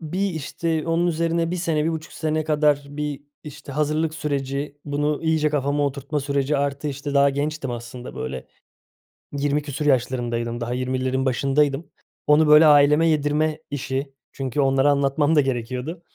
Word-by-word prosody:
bir, 185 +5 -2
işte, 160 0 -3
onun 170 +1 +2
üzerine 165 0 0
1 180 - -2
sene, 160 -3 0
1,5 160 -1 -3
sene 155 0 -1
kadar 150 -2 +2
bir, 145 -1 -4 0.2
işte, 150 -1 -9
hazırlık 155 +2 0
süreci, 140 -1 -3
bunu 145 +1 -1
iyice 160 -1 +2
kafama 145 0 0
oturtma 140 +2 -3
süreci 140 +1 0
artı, 140 +1 -1
işte, 140 +1 -5
daha 140 0 +5
gençtim 145 0 -3
aslında, 120 +1 -7
böyle, 65 0 -5 0.9
yirmi 145 +1 0
küsur 145 +1 -5
yaşlarındaydım, 120 -3 0
daha 120 +1 -2
20'lerin 130 +1 -1
başındaydım. 140 +3 +1 0.4
Onu, 150 +1 +5
böyle, 150 +1 +8
aileme 150 +2 +6
yedirme 155 0 +1
işi 135 0 -3 0.2
çünkü 135 +1 -2
onlara 135 +1 +3
anlatmam 145 +2 +2
da 150 - +6
gerekiyordu. 130 +5 -3
145 Hz, 150 wpm, -23 LUFS, 135-155 Hz, 0.9 s, böyle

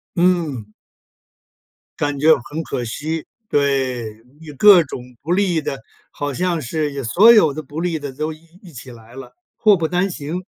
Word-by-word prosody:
嗯。 170 - +1 1.3
感 145 -1 -2
觉 160 +2 +6
很 150 +6 -6
可 125 -5 -4
惜， 155 +7 -4 0.2
对。 130 -6 -1 0.2
你 155 -2 -10
各 195 -3 +7
种 130 - -7 0.2
不 160 +5 -5
利 180 -4 +1
的， 135 - -4 0.3
好 145 -1 -4
像 175 0 -1
是 145 0 -3
所 200 - +6
有 160 -11 +5
的 155 +1 -6
不 150 +4 -8
利 175 -2 -1
的 145 -2 -6
都 155 +4 -4
一 155 - -17 0.2
一 175 - -13
起 125 0 -10
来 115 +1 -15
了， 135 - -10 0.2
祸 210 -4 +4
不 160 -1 -1
单 180 +3 0
行。 170 +3 -5
155 Hz, 180 characters per minute, -19 LUFS, 135-175 Hz, 1.3 s, 各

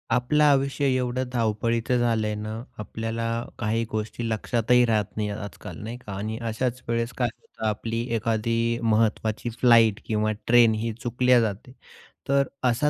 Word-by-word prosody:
आपलं 150 +5 +2
आयुष्य 140 -1 +3
एवढं 125 0 -1
धावपळीचं 115 +1 0
झालंय 110 -3 +1
ना, 110 +2 -5 0.2
आपल्याला 115 +2 -4 0.4
काही 115 0 0
गोष्टी 110 +2 -3
लक्षातही 120 +2 +2
राहत 110 -3 +2
नाही, 105 -1 -1
आजकाल 100 -1 -7
नाही 115 +3 -5
का 120 -5 -10
आणि 110 +2 -3
अशाच 125 +2 -2
वेळेस 115 +1 -1
काय 125 - +2
होतं 110 - -9
आपली 115 +2 -2
एखादी 115 +1 0
महत्त्वाची 110 0 +1
फ्लाइट 115 -4 +5
किंवा 110 0 0 0.2
ट्रेनही 115 -1 +4
चुकल्या 125 +1 +3
जाते, 110 +4 -3 0.6
तर 140 0 +3 0.2
असा 125 +5 +2
115 Hz, 140 wpm, -25 LUFS, 110-120 Hz, 0.6 s, फ्लाइट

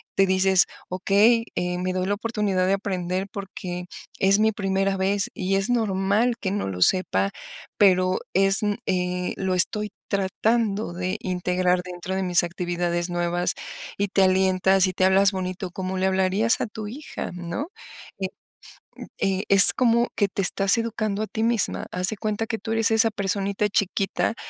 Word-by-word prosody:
Te 195 - +4
dices: 190 0 +4 0.2
"Okey 205 +5 +3
eh, 180 0 -2
me 185 0 -2
doy 185 0 -1
la 200 - 0
oportunidad 205 -4 -1
de 195 - +2
aprender 185 -1 -2
porque 180 -3 -6 0.3
es 195 +1 +4
mi 220 +1 +3
primera 195 -1 -1
vez 195 +1 0
y 190 +1 -1
es 195 +2 0
normal 220 0 +1
que 190 - -2
no 205 +1 -2
lo 90 -2 -5
sepa, 100 - +2 0.5
pero 185 -2 +3
es 195 0 +3 0.3
eh, 180 0 -1
lo 190 -1 -1
estoy 210 +3 +1 0.2
tratando 205 +1 0
de 180 +1 -3
integrar 180 0 0
dentro 180 +1 -6
de 190 - -1
mis 180 0 +3
actividades 175 0 -2
nuevas". 175 0 -1 0.4
Y 200 0 -1
te 195 0 +2
alientas, 190 0 +3
y 185 - -3
te 185 - +1
hablas 195 +1 +4
bonito, 185 -1 -5
como 185 +1 -4
le 190 +1 +1
hablarías 190 +4 +1
a - - -2
tu 215 -1 -7
hija, 280 +8 -7
¿no? 175 - -5 0.5
Eh, 190 - -1 0.9
eh, 195 +1 0
es 195 0 +9
como 235 -1 +2
que 205 - +2
te 195 - -3
estás 195 +3 +2
educando 215 -3 -2
a - - -2
ti 220 - -4
misma, 230 -2 0
haz 180 +1 -1
de 220 - -5
cuenta 215 +1 -2
que 225 - -3
tú 220 +2 -5
eres 225 -1 +2
esa 225 0 +3
personita 200 0 -1
chiquita 200 +2 0
190 Hz, 170 wpm, -24 LUFS, 185-205 Hz, 0.9 s, es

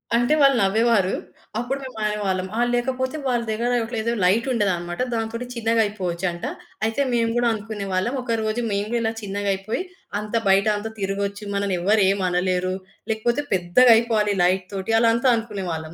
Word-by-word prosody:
అంటే 240 +5 +3
వాళ్ళు 275 -1 +6
నవ్వేవారు. 210 -1 +3 0.5
అప్పుడు 260 +3 -2
మేమనేవాళ్ళం 210 -6 -2
ఆహ్, 240 - +2
లేకపోతే 260 +3 -1
వాళ్ళ 245 -2 +1
దగ్గర 230 +3 -1
ఒకటి 230 +1 -5
ఏదో 230 +2 -1
లైటుండేదనమాట. 190 -4 +1
దాంతోటి 230 +1 -3
చిన్నగా 230 0 +2
అయిపోవచ్చంట. 180 -3 -3 0.4
అయితే 225 +5 0
మేము 230 -1 +2
గూడా 240 0 +2
అనుకునే 210 -1 -5
వాళ్ళం. 185 +7 0
ఒకరోజు 225 -1 -1
మేము 200 0 0
గూడా 240 - +1
ఇలా 225 - +1
చిన్నగా 200 0 -2
అయిపోయి 195 - -3 0.4
అంత 210 +2 -5
బయట 195 +2 +4
అంతా 220 +2 -5
తిరగొచ్చు, 200 +1 -2
మనల్ని 200 -2 0
ఎవరు 205 +3 +3
ఏమనలేరు. 185 -1 0 0.4
లేకపోతే 235 +6 0
పెద్దగా 185 +7 +5
అయిపోవాలి 220 -3 +1
లైట్ 185 +1 +2
తోటి. 195 +3 -2
అలా 230 0 +4
అంతా 255 +3 +2
అనుకునేవాళ్ళం. 185 -8 -4
215 Hz, 155 wpm, -23 LUFS, 190-235 Hz, 0.5 s, వాళ్ళు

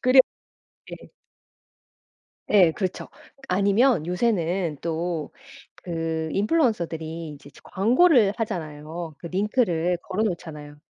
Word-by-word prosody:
그래 255 +1 +7 0.7
예. - - -10 1.4
예 185 -6 +6
그렇죠. 185 +2 -4 0.4
아니면 200 - +3
요새는 180 -4 0
또 165 -2 -3 0.6
그 165 -1 -2
인플루언서들이 170 - 0
이제 145 -1 -12
저 - - -17
광고를 235 - +4
하잖아요. 160 -5 -5
그 - - -7
링크를 180 -3 +1
걸어 195 +3 -2
놓잖아요. 150 -7 -5
175 Hz, 230 characters per minute, -24 LUFS, 160-210 Hz, 1.4 s, 그래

